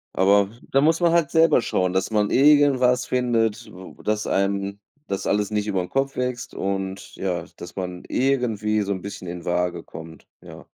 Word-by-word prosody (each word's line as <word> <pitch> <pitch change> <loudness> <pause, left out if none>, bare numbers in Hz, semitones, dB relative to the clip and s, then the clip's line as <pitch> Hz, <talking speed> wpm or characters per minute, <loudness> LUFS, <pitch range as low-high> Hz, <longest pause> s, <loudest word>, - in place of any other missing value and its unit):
aber, 100 +1 +4
w 115 - -18
da 135 - +4
muss 160 +3 +3
man 170 -1 +4
halt 170 -4 +2
selber 160 -5 +4
schauen, 90 -4 0
dass 95 0 0
man 105 -1 +1
irgendwas 135 -3 +4
findet, 120 -3 0
w 95 +1 -12
dass 105 0 -1
einem 100 +1 -1 0.3
das 100 -1 -3
alles 105 0 0
nicht 105 0 -1
über 95 -3 0
'n 90 - -6
Kopf 135 0 -1
wächst 125 -1 -3
und 95 0 -4
ja, 90 -3 -3
dass 85 - -10
man 90 -2 -5
irgendwie 115 -5 0
so 100 0 -2
'n 95 -2 -3
bisschen 100 -2 -8
in 85 0 -7
Waage 90 -1 -1
kommt. 80 0 -11
Ja. - - -12
105 Hz, 190 wpm, -23 LUFS, 95-125 Hz, 0.3 s, aber